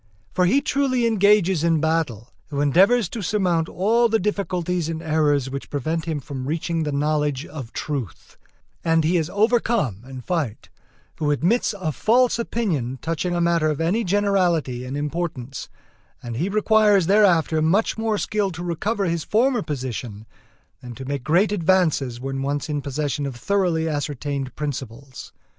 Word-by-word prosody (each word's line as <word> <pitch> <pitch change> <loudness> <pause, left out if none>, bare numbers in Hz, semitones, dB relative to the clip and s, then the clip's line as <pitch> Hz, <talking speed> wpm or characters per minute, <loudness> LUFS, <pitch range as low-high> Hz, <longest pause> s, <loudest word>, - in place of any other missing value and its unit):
For 180 0 +2
he 270 +10 +3
truly 270 -4 +1
engages 200 -6 +3
in 165 -2 +3
battle 155 -8 -1 0.2
who 145 -2 -4
endeavors 190 - +4
to 225 - -5
surmount 180 -5 0
all 230 +5 +2
the 225 - +3
difficulties 180 -4 -1
and 160 -1 -3
errors 150 -4 +1
which 140 0 -6
prevent 160 +3 -2
him 160 -3 -2
from 135 -2 -6
reaching 165 +2 -1
the 150 -2 -1
knowledge 150 0 0
of 135 -6 -8
truth, 135 - -5 0.5
and 165 -1 +2
he 165 +4 +2
is 160 -2 0
overcome 215 - +1
in 130 -1 -7
fight 145 -7 -3 0.5
who 150 -2 -1
admits 180 - +1
a 160 -4 -1
false 240 - +2
opinion 165 - -2
touching 165 +4 -2
a 175 - 0
matter 170 -2 +2
of 150 - -2
any 180 +8 +1
generality 180 - +1
and 130 +3 -4
importance, 145 -4 -4 0.5
and 120 -1 -5
he 170 +8 -1
requires 210 -2 +4
thereafter 175 -5 +3
much 185 +8 +2
more 220 -1 -1
skill 205 -1 -1
to 175 +2 -6
recover 195 +5 -1
his 170 -2 -1
former 240 - +2
position 125 -7 -5 0.6
than 125 -1 -9
to 135 - -8
make 140 -1 -3
great 175 +9 +3
advances 165 -10 +1
when 135 +1 -4
once 145 +2 -2
in 145 -1 -1
possession 145 +1 -2
of 135 - -6
thoroughly 175 +2 0
ascertained 145 -2 -3
principles. 135 -2 -6
165 Hz, 160 wpm, -23 LUFS, 140-195 Hz, 0.6 s, endeavors